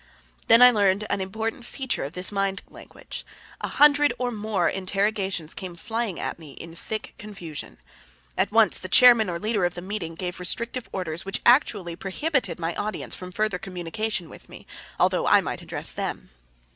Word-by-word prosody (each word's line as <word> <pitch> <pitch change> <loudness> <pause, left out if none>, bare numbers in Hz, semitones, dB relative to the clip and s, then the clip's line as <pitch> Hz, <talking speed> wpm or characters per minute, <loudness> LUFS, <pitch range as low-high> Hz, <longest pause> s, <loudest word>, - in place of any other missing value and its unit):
Then 230 +2 +8
I 250 - +10
learned 200 -2 +2
an 200 - 0
important 220 +5 -4
feature 265 +2 -3
of 140 +4 -6
this 180 +2 +3
mind 195 -1 -1
language. - - -10 0.4
A - - -2
hundred 295 0 +5
or 250 -1 -2
more 210 -5 -1
interrogations 195 -3 -1
came 185 -3 -7
flying 220 +1 -3
at - - -4
me 150 -4 -12
in 165 +3 -10
thick 215 +6 -6
confusion. 180 -8 -8 0.6
At - - 0
once 220 -3 +5
the 185 - -7
chairman 235 -2 +7
or 170 - -2
leader 210 +1 -1
of 175 0 0
the 175 - -6
meeting 185 -4 -5
gave 180 +1 -5
restrictive 235 +7 0
orders 170 -3 -3
which 195 +1 -1
actually 210 - +3
prohibited 200 - -2
my 165 0 -3
audience 215 +1 -4
from 180 0 -7
further 215 -1 -1
communication 185 +1 -3
with - - -15
me, - - -13 0.3
although - - +2
I - - +6
might - - -4
address - - -1
them. - - -5
195 Hz, 175 wpm, -25 LUFS, 180-220 Hz, 0.6 s, I